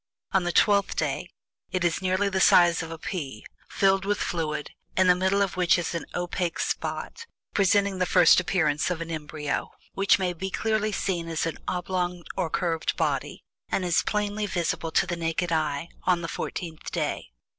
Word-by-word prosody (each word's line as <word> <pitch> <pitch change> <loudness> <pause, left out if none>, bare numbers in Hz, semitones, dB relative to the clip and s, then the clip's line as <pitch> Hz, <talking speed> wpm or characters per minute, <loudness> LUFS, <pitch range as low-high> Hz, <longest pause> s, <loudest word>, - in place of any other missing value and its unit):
On 190 -3 +2
the 175 - +1
TWELFTH 200 +1 +3
DAY 155 +4 -2 0.4
it 185 -1 -1
is 170 +1 +1
nearly 190 +2 +1
the 190 -1 0
size 175 -2 +6
of 165 - -6
a 165 - -6
pea, 145 - -5 0.2
filled 195 -1 +2
with 205 +1 0
fluid, 150 -3 -2 0.3
in 185 - +5
the 180 - +7
middle 190 +2 +2
of 195 - -3
which 180 -1 +4
is 175 0 -2
an 170 - -4
opaque 175 -1 -2
spot, 465 0 -3 0.3
presenting 200 -1 +2
the 180 - +1
first 170 - +6
appearance 165 -5 +1
of 180 -3 -2
an 165 0 -5
embryo, 150 -2 -3 0.2
which 195 0 +4
may 185 -2 -1
be 190 +3 -4
clearly 215 +1 0
seen 175 -4 -2
as 165 -1 -1
an 165 - -4
oblong 180 -1 -2
or 165 - -1
curved 165 -1 -1
body, - - -1 0.3
and 185 - 0
is 175 -1 +3
plainly 210 0 -1
visible 170 -3 -1
to - - +3
the 175 0 -2
naked 170 +1 -1
eye 155 -1 0 0.2
on 175 -2 +2
the - - -2
fourteenth 165 -1 -5
day. - - -2
180 Hz, 185 wpm, -26 LUFS, 165-190 Hz, 0.4 s, the